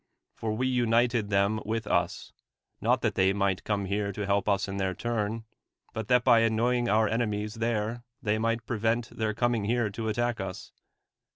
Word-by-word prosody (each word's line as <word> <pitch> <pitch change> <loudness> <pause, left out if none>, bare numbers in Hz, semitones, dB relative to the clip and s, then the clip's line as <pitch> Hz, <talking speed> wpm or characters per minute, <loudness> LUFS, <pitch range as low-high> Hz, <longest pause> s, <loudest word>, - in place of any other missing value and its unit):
For 110 -1 -3
v/e 130 - 0
united 120 -3 +2
them 100 +2 +2
with 115 +1 -2
ils, 85 -4 -1 0.5
not - - +2
that - - +1
they 95 +1 +3
might 100 -1 0
come 100 -2 -1
here 100 +1 -1
to 105 +1 -3
help 100 +1 +1
us 100 0 +1
in 100 0 -4
their 95 -1 -1
turn, 115 +1 -2 0.5
but 110 -1 -4
that 125 +1 +4
by 120 -3 +6
anucniug 120 +1 +2
our 110 +1 +4
enemies 105 -2 -1
there 115 0 -2 0.2
they 110 0 0
might 115 +1 0
prevent 115 0 -1
tbv - - -10
ir 110 -1 +1
coiiiing 120 -4 +1
here 120 -2 +1
to 110 +2 -3
attack 120 +1 0
us. 95 -2 -6
110 Hz, 185 wpm, -28 LUFS, 100-115 Hz, 0.5 s, by